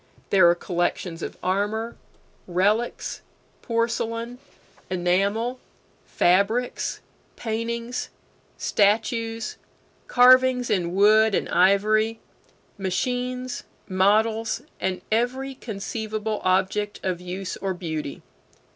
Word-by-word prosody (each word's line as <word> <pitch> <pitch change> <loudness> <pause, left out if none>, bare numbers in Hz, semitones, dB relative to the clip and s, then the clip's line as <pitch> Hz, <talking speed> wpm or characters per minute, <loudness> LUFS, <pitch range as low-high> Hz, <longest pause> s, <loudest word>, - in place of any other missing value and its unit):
There 185 -3 +7
are 170 - +4
collections 175 -1 -2
of - - -6
armor, 210 +5 -1 0.5
relics, 205 +7 0 0.4
porcelain, 230 +1 -2 0.5
enamel, 200 +7 0 0.5
fabrics, 200 +7 +1 0.3
paintings, 235 +1 -3 0.5
statues, 225 +2 0 0.5
carvings 255 0 +5
in 175 -2 0
wood 215 +1 +5
and - - 0
ivory, 215 +4 +3 0.6
machines, 250 +6 -2 0.3
models, 215 +4 +2 0.2
and 185 -1 -2
every 255 +4 0
conceivable 215 -1 -4
object 190 +3 +1
of 180 -2 -2
use 180 +1 -5
or 190 -1 -2
beauty. 160 -5 -5
215 Hz, 85 wpm, -24 LUFS, 190-230 Hz, 0.6 s, There